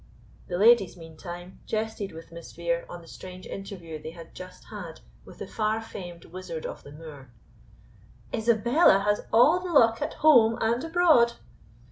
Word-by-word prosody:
The 175 - -3
ladies, 210 -3 +5
meantime, 175 +2 -10
jested 215 -2 -3
with 165 +1 -12
Miss 170 0 -11
Vere 170 0 -2
on 175 -1 -9
the - - -16
strange 185 +1 -10
interview 175 -6 -8
they 155 - -7
had 165 0 -12
just 185 0 -11
had - - -8 0.2
with - - -14
the - - -6
far 215 0 -1
famed 175 -6 -9
wizard 170 -2 -7
of - - -6
the 145 - -13
Moor. 145 -4 -11 1.0
"Isabella 235 - +4
has 210 0 +1
all 275 +10 +5
the 365 -1 -5
luck 230 -7 +4
at - - -3
home 235 -7 +5
and 230 +3 0
abroad! 325 -8 +4
195 Hz, 160 wpm, -27 LUFS, 170-230 Hz, 1.0 s, ladies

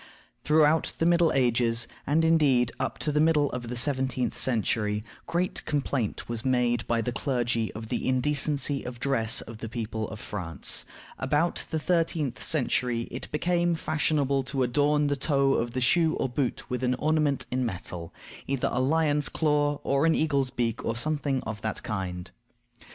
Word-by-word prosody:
Throughout 155 +1 +3
the 165 - 0
Middle 170 -1 +4
Ages, 120 -2 +2 0.2
and, 160 +4 +3
indeed, 140 -7 +3
up - - -2
to 150 - -1
the 150 - +1
middle 150 -3 +3
of 120 -1 -5
the 125 - -4
seventeenth 130 0 0
century, 105 -3 +1 0.2
great 180 +2 -1
complaint 140 -6 -2
was 115 -1 -3
made 125 -2 +1
by 115 -1 +1
the 125 - -2
clergy 120 -3 -1
of 110 0 -8
the - - -2
indecency 140 +1 +2
of 125 0 -6
the - - -15
dress 115 -5 +2
of 110 -1 -10
the 115 - -6
people 110 -2 -4
of 110 - -8
France. 90 -7 -1 0.3
About 145 +6 0
the 160 - -1
thirteenth 160 -5 0
century 125 -5 0
it 125 - -6
became 175 +2 +1
fashionable 150 -3 0
to 135 0 -1
adorn 145 +4 +2
the 145 0 +1
toe 140 -1 +2
of 115 0 -1
the 130 - -2
shoe 160 +5 +3
or - - -1
boot 130 0 -2
with 125 0 -3
an 125 0 +2
ornament 150 -1 +1
in 130 +1 0
metal; 90 -6 -5 0.4
either 135 -2 0
a 125 - -1
lion's 150 +1 +2
claw, 145 -2 +1
or 140 +3 +2
an 160 - +3
eagle's 140 -4 +1
beak, 120 -3 -2
or 115 - -1
something 145 0 -1
of 110 -1 -6
that 110 -1 -3
kind. 90 -3 -4
130 Hz, 175 wpm, -27 LUFS, 120-150 Hz, 0.4 s, Middle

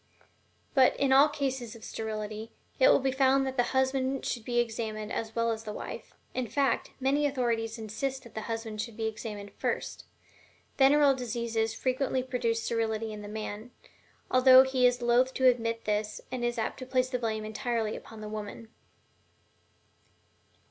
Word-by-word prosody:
But, 260 -2 +5
in 275 -1 +3
all 280 +3 +7
cases 265 -6 -3
of 230 - -13
sterility, 215 0 -5 0.3
it - - +7
will - - +7
be 265 0 +1
found 270 0 +3
that 265 0 -3
the 245 -2 +2
husband 265 0 0
should 235 - -2
be 240 +1 -2
examined 220 -2 -2
as 225 -1 -4
well 230 0 +1
as 220 0 -4
the 215 - -5
wife - - -8 0.2
in 255 -2 -2
fact, 260 +2 0
many 280 +3 +2
authorities 235 -4 -1
insist 255 +5 -4
that 235 -3 -14
the 220 - -4
husband 225 -2 -3
should 230 -1 -7
be 225 - -2
examined 210 -2 -5
first. - - -3 0.7
Venereal 280 +1 +6
diseases 230 -3 -2
frequently 260 0 0
produce 235 -3 -1
sterility 225 -1 -1
in 210 - -7
the 205 - -8
man, 215 +1 -6 0.6
although 255 0 +8
he 260 -1 +3
is 245 0 0
loath 245 +2 +3
to 260 - +1
admit 230 -2 +2
this 210 0 -1
and 255 -2 -3
is 240 0 -1
apt 225 - -2
to 255 - -7
place 255 0 +1
the 250 - -1
blame 220 -2 -2
entirely 220 0 -2
upon 225 -1 -10
the 215 - -6
woman. 215 +1 -7
235 Hz, 170 wpm, -29 LUFS, 220-260 Hz, 0.7 s, although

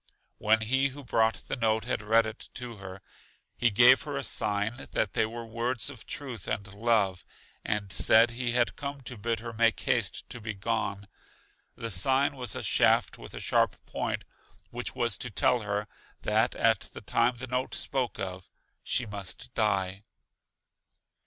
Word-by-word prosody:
When 110 +1 +3
he 130 +5 +2
who 140 +1 -9
brought 115 -2 +1
the - - -2
note 110 -2 +1
had 125 - -1
read 115 +2 +4
it 110 +2 -7
to 120 -3 -4
her, 95 -1 -9 0.5
he 120 - +3
gave 120 +5 +7
her 145 -2 -4
a 140 - -2
sign 105 0 0 0.2
that - - 0
they 110 - +2
were 115 +1 -7
words 120 +4 -2
of 125 -6 -12
truth 125 -8 -5
and 100 -2 -3
love, 100 -4 +1 0.4
and 105 -2 -1
said 115 +4 +6
he 120 0 -2
had 120 -1 +2
come 140 -1 -5
to 125 0 -7
bid 115 +1 -2
her 115 0 -6
make 115 0 +3
haste 125 -6 0
to 120 - -7
be 110 0 -4
gone. 100 -1 -2 0.7
The 115 0 -4
sign 135 - +2
was 125 -5 -4
a - - -4
shaft - - +3
with - - -10
a - - -5
sharp - - +2
point, - - -3 0.5
which 120 +1 -4
was 120 -5 +1
to 125 - -4
tell 120 +3 +3
her, 105 -1 -2 0.4
that 110 +3 +2
at 110 -2 +3 0.2
the - - -7
time 120 +1 +2
the 130 - -5
note 125 +1 -2
spoke 130 -4 -2
of, 95 -1 -5 0.3
she 130 - 0
must 100 -3 -7
die. 100 -3 +1
115 Hz, 175 wpm, -29 LUFS, 105-125 Hz, 0.7 s, gave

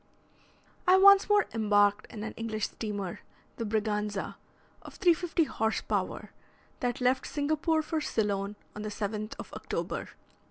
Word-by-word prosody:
I 370 +1 +7
once 400 +1 +7
more 415 0 +5
embarked 205 -1 +3
in 215 -3 -7
an 220 - -5
English 220 -2 -2
steamer, 205 -5 -4 0.4
the 230 - -3
"Braganza," 210 -2 -1 0.5
of - - -12
350 345 -2 +2
horse 220 -5 -1
power, - - -2 0.5
that 250 +1 -2
left 255 +1 +2
Singapore 310 +2 0
for 315 0 -2
Ceylon 205 -5 -1 0.2
on 210 - -6
the 215 - -3
7th 210 +1 -4
of - - -9
October. - - -4
220 Hz, 135 wpm, -29 LUFS, 210-310 Hz, 0.5 s, I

